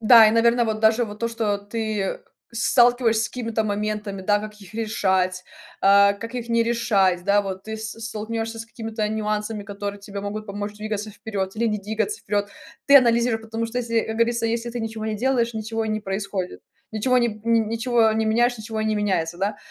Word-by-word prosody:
Да, 225 Hz, 0 st, +8 dB
и, -, -, +3 dB
наверно, 235 Hz, +1 st, +3 dB
вот 220 Hz, -1 st, -1 dB
даже 220 Hz, +2 st, +4 dB
вот 210 Hz, -1 st, -9 dB
то, 230 Hz, -, -1 dB
что 220 Hz, -3 st, -1 dB
ты, 215 Hz, +1 st, -3 dB
э, 195 Hz, -, -3 dB, 0.3 s
с 230 Hz, 0 st, 0 dB
сталкиваешься 240 Hz, -2 st, +4 dB
с -, -, -3 dB
какими-то 230 Hz, -3 st, -2 dB
моментами, 210 Hz, -1 st, -3 dB
да. 205 Hz, +2 st, +3 dB
Как 210 Hz, 0 st, -7 dB
их 195 Hz, 0 st, -14 dB
решать, 190 Hz, -4 st, 0 dB, 0.4 s
а, 200 Hz, 0 st, +6 dB
как 230 Hz, +4 st, -8 dB
их 240 Hz, -1 st, -5 dB
не 230 Hz, 0 st, +3 dB
решать? 200 Hz, -6 st, +2 dB
Да, 200 Hz, +1 st, +3 dB
вот 190 Hz, -1 st, -6 dB
ты 220 Hz, 0 st, -5 dB
с 220 Hz, 0 st, -5 dB
столкнешься 225 Hz, +1 st, -4 dB
с -, -, -6 dB
какими-то 225 Hz, -2 st, -4 dB
нюансами, 210 Hz, 0 st, -2 dB
которые 200 Hz, 0 st, -5 dB
тебе 200 Hz, 0 st, -7 dB
могут 210 Hz, +2 st, -5 dB
помочь 205 Hz, +1 st, -5 dB
двигаться 215 Hz, 0 st, -4 dB
вперед 200 Hz, -2 st, -4 dB
или 235 Hz, -, +1 dB
не 210 Hz, -1 st, -1 dB
двигаться 220 Hz, -, -2 dB
вперед. 205 Hz, -1 st, -1 dB, 0.4 s
Ты 280 Hz, 0 st, +9 dB
анализируй, 235 Hz, -2 st, +2 dB
потому 225 Hz, +1 st, -4 dB
что 230 Hz, +2 st, -3 dB
если, 230 Hz, -1 st, -2 dB
э, -, -, -1 dB
как 220 Hz, -, -3 dB
говорится, 230 Hz, 0 st, +1 dB
если 235 Hz, +1 st, -2 dB
ты 245 Hz, -, -5 dB
ничего 220 Hz, -1 st, -4 dB
не 215 Hz, -1 st, -2 dB
делаешь, 240 Hz, 0 st, +1 dB
ничего 220 Hz, +1 st, -3 dB
и -, -, -3 dB
не 215 Hz, 0 st, 0 dB
происходит 195 Hz, -2 st, -4 dB, 0.3 s
ничего 250 Hz, +4 st, +2 dB
ни 240 Hz, -, +3 dB
н 225 Hz, 0 st, 0 dB
ничего 230 Hz, 0 st, +2 dB
не 220 Hz, 0 st, 0 dB
меняешь- 240 Hz, +3 st, +2 dB
ничего 220 Hz, 0 st, -5 dB
и 215 Hz, -, -1 dB
не 215 Hz, -, +1 dB
меняется, 185 Hz, -5 st, -1 dB
да. 200 Hz, +2 st, -1 dB
220 Hz, 215 wpm, -23 LUFS, 205-230 Hz, 0.4 s, Ты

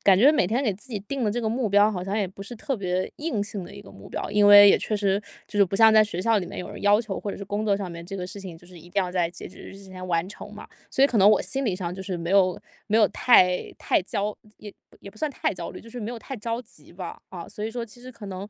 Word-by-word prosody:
感 195 Hz, -2 st, +6 dB
觉 270 Hz, +7 st, +7 dB
每 300 Hz, -, +2 dB
天 240 Hz, +7 st, 0 dB
给 220 Hz, -, +1 dB
自 200 Hz, +7 st, -10 dB
己 210 Hz, -, -2 dB
定 250 Hz, +5 st, -4 dB
的 210 Hz, -, +1 dB
这 240 Hz, +3 st, -2 dB
个 220 Hz, -, -1 dB
目 230 Hz, 0 st, -1 dB
标 205 Hz, +2 st, +5 dB
好 180 Hz, -3 st, -4 dB
像 195 Hz, +2 st, -2 dB
也 205 Hz, -3 st, 0 dB
不 195 Hz, +1 st, -11 dB
是 200 Hz, +5 st, -7 dB
特 265 Hz, +3 st, -3 dB
别 185 Hz, -2 st, -2 dB
硬 295 Hz, -9 st, -2 dB
性 200 Hz, -2 st, -5 dB
的 -, -, -12 dB
一 200 Hz, -, -10 dB
个 195 Hz, -, -14 dB
目 -, -, -13 dB
标。 -, -, -5 dB
因 205 Hz, 0 st, +4 dB
为 205 Hz, 0 st, +10 dB
也 -, -, +4 dB
确 215 Hz, -, -1 dB
实 200 Hz, -1 st, +1 dB, 0.3 s
就 205 Hz, -, -4 dB
是 200 Hz, -, +7 dB
不 195 Hz, +1 st, -6 dB
像 220 Hz, +1 st, +6 dB
在 215 Hz, 0 st, +7 dB
学 190 Hz, -4 st, -4 dB
校 225 Hz, +1 st, +3 dB
里 180 Hz, -, -4 dB
面 -, -, -8 dB
有 180 Hz, -, -6 dB
人 -, -, -9 dB
要 205 Hz, +1 st, +5 dB
求 215 Hz, -4 st, -5 dB
或 205 Hz, -, -4 dB
者 -, -, -6 dB
是 200 Hz, -, -7 dB
工 205 Hz, +2 st, -3 dB
作 200 Hz, -2 st, +3 dB
上 195 Hz, -3 st, -5 dB
面 170 Hz, 0 st, -8 dB
这 195 Hz, +3 st, -7 dB
个 180 Hz, -1 st, -4 dB
事 200 Hz, +2 st, -9 dB
情 180 Hz, -4 st, -8 dB
就 175 Hz, -, -19 dB
是 180 Hz, -1 st, -14 dB
一 170 Hz, -, -15 dB
定 200 Hz, 0 st, +1 dB
要 180 Hz, -, -4 dB
在 180 Hz, -2 st, 0 dB
截 175 Hz, -, -10 dB
止 185 Hz, -, -16 dB
日 -, -, -11 dB
之 195 Hz, -, -13 dB
前 185 Hz, -1 st, -9 dB
完 170 Hz, -1 st, 0 dB
成 -, -, -10 dB
嘛， -, -, -11 dB, 0.2 s
所 270 Hz, -, +2 dB
以 -, -, +7 dB
可 250 Hz, -, -2 dB
能 195 Hz, +2 st, +7 dB
我 210 Hz, -, +4 dB
心 270 Hz, 0 st, -3 dB
理 205 Hz, -7 st, 0 dB
上 180 Hz, -2 st, -4 dB
就 190 Hz, -, -7 dB
是 190 Hz, -1 st, -4 dB
没 170 Hz, +1 st, -4 dB
有 185 Hz, -2 st, +3 dB, 0.3 s
没 215 Hz, +1 st, +1 dB
有 215 Hz, -2 st, +6 dB
太 180 Hz, -7 st, +3 dB
太 -, -, +1 dB
焦 205 Hz, +2 st, -3 dB, 0.2 s
也 205 Hz, -1 st, -10 dB, 0.3 s
也 200 Hz, -, -10 dB
不 205 Hz, -, -22 dB
算 305 Hz, +5 st, -2 dB
太 -, -, -1 dB
焦 175 Hz, -2 st, -6 dB
虑， -, -, -10 dB
就 230 Hz, -, -14 dB
是 245 Hz, -, -8 dB
没 220 Hz, 0 st, -4 dB
有 240 Hz, -, -6 dB
太 270 Hz, +4 st, -7 dB
着 230 Hz, +2 st, -3 dB
急 165 Hz, -10 st, -16 dB
吧。 175 Hz, -1 st, -8 dB
啊， 175 Hz, -2 st, -8 dB
所 210 Hz, -, -6 dB
以 220 Hz, -, -3 dB
说 235 Hz, 0 st, -4 dB
其 235 Hz, +2 st, -14 dB
实 255 Hz, +1 st, -10 dB
可 210 Hz, -3 st, -10 dB
能， 190 Hz, +1 st, -6 dB
205 Hz, 355 characters per minute, -25 LUFS, 185-220 Hz, 0.3 s, 为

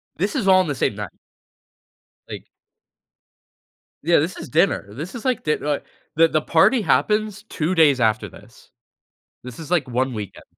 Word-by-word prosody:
This 200 Hz, +5 st, -2 dB
is 195 Hz, -, -1 dB
all 185 Hz, 0 st, +6 dB
in 185 Hz, -, -3 dB
the 145 Hz, -, -2 dB
same -, -, -1 dB
night -, -, -6 dB, 1.2 s
Like -, -, -8 dB, 1.6 s
Yeah, 170 Hz, -, +4 dB
this 165 Hz, +5 st, -2 dB
is -, -, -9 dB
dinner. 155 Hz, -, +1 dB
This 155 Hz, -, -7 dB
is, 235 Hz, -, -7 dB
like, 255 Hz, -3 st, -1 dB
di 150 Hz, -, +1 dB
like, 145 Hz, -1 st, -3 dB, 0.3 s
the 165 Hz, +2 st, +5 dB
the 155 Hz, -1 st, 0 dB
party 195 Hz, -, +3 dB
happens 210 Hz, 0 st, 0 dB
2 175 Hz, -5 st, -3 dB
days 150 Hz, -7 st, +4 dB
after 110 Hz, -1 st, +1 dB
this. -, -, -17 dB, 0.7 s
This 125 Hz, +2 st, -10 dB
is, 160 Hz, 0 st, -9 dB
like, 165 Hz, -7 st, +1 dB
1 130 Hz, +1 st, -1 dB
weekend. 105 Hz, -4 st, -7 dB
160 Hz, 170 wpm, -21 LUFS, 140-190 Hz, 1.6 s, all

